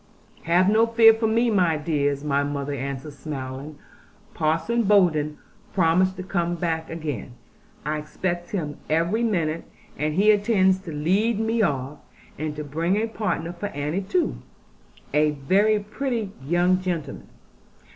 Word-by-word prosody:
'Have 175 +3 +4
no 220 +3 +4
fear 230 -1 +7
for 225 0 0
me, 230 +2 +2
my 175 -6 +3
dears,' 145 -2 -1
our 140 -1 +1
mother 145 0 -3
answered 140 +2 -5
smiling: 140 0 -6 0.6
'Parson 165 +9 +1
Bowden 170 -8 +3 0.4
promised 185 +1 +3
to 185 - -5
come 175 -2 -1
back 160 -1 -2
again; 155 -6 -5 0.5
I 150 0 -1
expect 175 +3 -4
him 150 -7 -3
every 170 +8 +1
minute; 170 -8 0 0.4
and 150 +1 0
he 205 +4 +5
intends 200 -3 +3
to 165 - -6
lead 195 +9 +1
me 225 +1 +1
off, 140 -5 -1 0.4
and 155 -1 -3
to 150 - -5
bring 165 +6 0
a 220 - +1
partner 210 -6 -3
for 175 +4 -4
Annie 150 +3 -2
too, 335 - 0 0.8
a 150 0 +4 0.2
very 210 +6 +4
pretty 220 0 -3
young 175 +5 +2
gentleman. 175 -5 -4
170 Hz, 145 wpm, -24 LUFS, 150-205 Hz, 0.8 s, fear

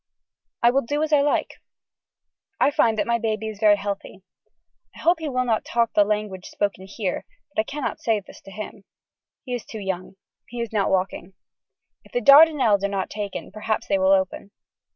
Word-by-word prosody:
I 235 - +6
will 270 +2 +2
do 290 +5 -1
as 310 -1 -1
I 290 - +6
like. 290 0 -1 1.0
I - - +4
find 225 -5 +2
that 210 - +1
my 235 +1 +1
baby 220 -1 -2
is 210 -2 -9
very 210 -1 +6
healthy. 200 -1 -6 0.7
I - - -13
hope 340 0 +3
he 315 -2 -3
will 255 -1 0
not 225 -3 +1
talk 235 -1 0
the 205 - +5
language 210 -3 -3
spoken 195 -2 -3
here 195 -2 -3 0.3
but - - +2
I - - -5
can 285 +3 -6
not - - -3
say 225 -2 +1
this 200 - -15
to 195 - -11
him. 205 0 -8 0.6
He 250 - -4
is 245 - -3
too 220 - -9
young. 190 -1 -4 0.3
He 245 - -8
is 235 -2 -4
not 200 -2 +1
walking. 190 0 -2 0.7
If - - -21
the - - +1
Dardenelles 280 - +6
are - - +2
not 195 -1 -3
taken 205 -2 -5
perhaps 215 +1 -2
they 195 -1 +1
will 190 0 +3
open. 190 0 +1
215 Hz, 200 wpm, -23 LUFS, 195-245 Hz, 1.0 s, I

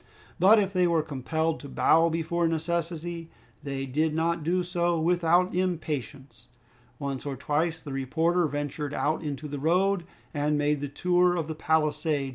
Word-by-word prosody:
But 195 +5 +7
if 200 -2 +1
they 180 -1 +3
were 165 -2 +2
compelled 160 +4 -2
to 140 - -9
bow 165 +4 +4
before 165 +1 0
necessity, 165 0 -3 0.3
they 140 -2 -4
did 155 +4 0
not 165 0 0
do 180 +3 +1
so 175 -1 0
without 175 +2 +2
impatience. 145 -9 -3 0.5
Once 140 -2 -4
or 140 -2 -4
twice 160 +5 -1
the 145 -4 -8
reporter 160 +6 +1
ventured 145 0 -4
out 155 +2 0
into 150 -1 -5
the 145 -1 -5
road 180 +4 +2 0.3
and 145 +1 0
made 145 0 +1
the 145 - -3
tour 180 +4 +2
of 165 -3 -2
the 160 - -3
palisade. 155 -2 0
160 Hz, 160 wpm, -27 LUFS, 145-175 Hz, 0.5 s, But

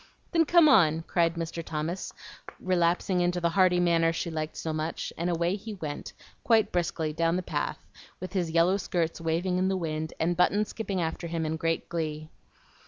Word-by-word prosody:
"Then 330 -2 +3
come 340 0 +6
on," 165 - +5
cried 165 0 +1
Mr. 165 0 -4
Thomas, 160 +4 -4 0.5
relapsing 180 0 +1
into 175 0 +1
the 170 -1 +1
hearty 185 -1 +4
manner 165 -2 +3
she 165 +1 -3
liked 155 -1 -4
so 160 - -3
much; 155 +1 -3
and 170 +2 -2
away 170 +2 +1
he 215 +1 -7
went, 150 -6 -6 0.3
quite 220 -3 +3
briskly, 165 -3 -1
down 165 +1 +1
the 185 - -1
path, - - -2 0.4
with 185 0 -7
his 180 -4 0
yellow 170 +4 +3
skirts 170 -4 -2
waving 175 +3 0
in 185 - +2
the 190 0 0
wind, 160 -2 -3
and 170 +2 +1
Button 205 +4 +3
skipping 200 -4 -3
after 160 +1 -3
him 165 -1 -2
in 155 +1 -1
great 165 0 -1
glee. 155 -2 -4
170 Hz, 185 wpm, -28 LUFS, 160-185 Hz, 0.5 s, come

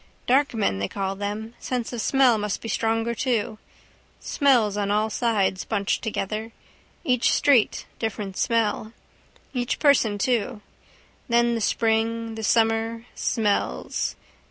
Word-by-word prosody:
Dark 270 0 +2
men 200 - 0
they 100 - -1
call 195 - -3
them. 210 +3 -4
Sense 250 -2 -3
of 235 - -3
smell 260 -4 +4
must 210 -1 -2
be - - -7
stronger 225 +1 0
too. 225 -3 -1 0.6
Smells 245 -8 +2
on 205 -1 -1
all 215 +2 +1
sides, 205 -6 +1
bunched 200 -3 -1
together. 220 0 -3 0.5
Each 250 -7 +2
street 260 -7 +3
different 205 -3 -3
smell. 225 -1 0 0.6
Each 245 -2 -1
person 250 -8 +3
too. 235 0 0 0.7
Then 235 0 +3
the 230 - -2
spring, 225 +1 0
the 220 - -6
summer: 225 +1 +1
smells. 210 -3 -1
225 Hz, 130 wpm, -24 LUFS, 210-235 Hz, 0.7 s, smell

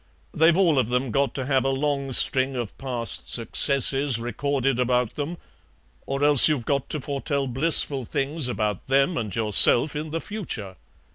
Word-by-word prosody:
They've 160 +2 +3
all 170 -8 +2
of 120 - -1
them 125 0 -2
got 140 +3 -1
to 135 - -4
have 135 -1 0
a 135 - 0
long 140 0 -2
string 130 +1 +1
of 120 -4 -5
past 125 -4 -4
successes 135 +2 +1
recorded 135 +2 -2
about 125 -2 0
them, 155 +4 -5 0.7
or 135 +1 -3
else 145 0 +7
you've 140 -7 -2
got 140 -2 -2
to 155 - -3
foretell 140 0 -3
blissful 135 0 +3
things 140 +3 -1
about 105 -5 -3
them 135 +6 +1
and 105 -5 -4
yourself 115 +6 +3
in 155 +1 -5
the 165 +2 -3
future. 160 - -7
135 Hz, 165 wpm, -23 LUFS, 125-145 Hz, 0.7 s, else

